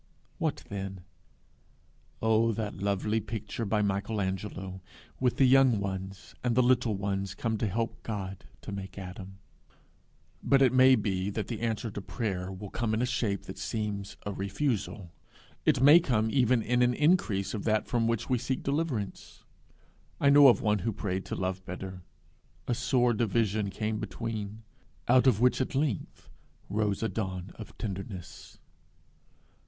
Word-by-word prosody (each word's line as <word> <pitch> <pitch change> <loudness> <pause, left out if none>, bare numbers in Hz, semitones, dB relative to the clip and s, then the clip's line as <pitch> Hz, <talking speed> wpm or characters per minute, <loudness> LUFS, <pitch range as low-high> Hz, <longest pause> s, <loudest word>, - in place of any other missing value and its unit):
what - - -1
then? 95 -2 -5 1.2
Oh 110 +1 +3
that 110 -2 -3
lovely 100 +2 0
picture 110 +1 -5
by 105 +1 +1
Michelangelo, 95 -1 -2 0.4
with 125 -2 +1
the 135 - +5
young 130 -4 +5
ones 95 0 -5
and 120 -2 +1
the 125 - +5
little 120 -3 +3
ones 100 -1 -2
come 115 -1 -1
to 110 - 0
help 115 +3 -2
God 95 -4 -5 0.2
to - - -7
make 95 -1 -7
Adam! 95 0 -8 1.0
But 135 -1 +4
it 130 - +4
may 130 0 +7
be 100 -3 -1
that 105 +1 -4
the 115 -3 -4
answer 115 0 -2
to 100 - -5
prayer 95 -4 -3
will 95 +1 -8
come 115 -2 -1
in 115 - 0
a - - +3
shape 115 -6 -1
that - - -9
seems 105 -2 -3
a 100 - -2
refusal. 100 - -2 0.6
It - - +4
may 145 +5 +9
come 110 -9 +1
even 125 -2 +3
in 125 +2 +1
an 125 0 +3
increase 145 - +2
of 105 - -3
that 110 -1 +1
from 115 -2 +1
which 115 -1 -1
we 125 -2 +1
seek 130 +2 -2
deliverance. 140 -8 -3 0.8
I 140 - +5
know 145 0 +9
of 125 - +5
one 105 -1 +2
who 115 +4 -2
prayed 95 -1 -3
to - - -4
love 95 0 -2
better: 95 0 -7 0.7
a 120 - +1
sore 120 0 +2
division 110 -2 +1
came 105 +2 -2
between 110 +1 -5 0.4
out 130 +2 +5
of 115 -6 +4
which 125 +2 +3
at 130 - -2
length 135 - -2 0.4
rose 105 0 0
a - - +2
dawn 95 -4 -4
of 110 - -11
tenderness. 95 -3 -7
110 Hz, 160 wpm, -29 LUFS, 95-120 Hz, 1.2 s, may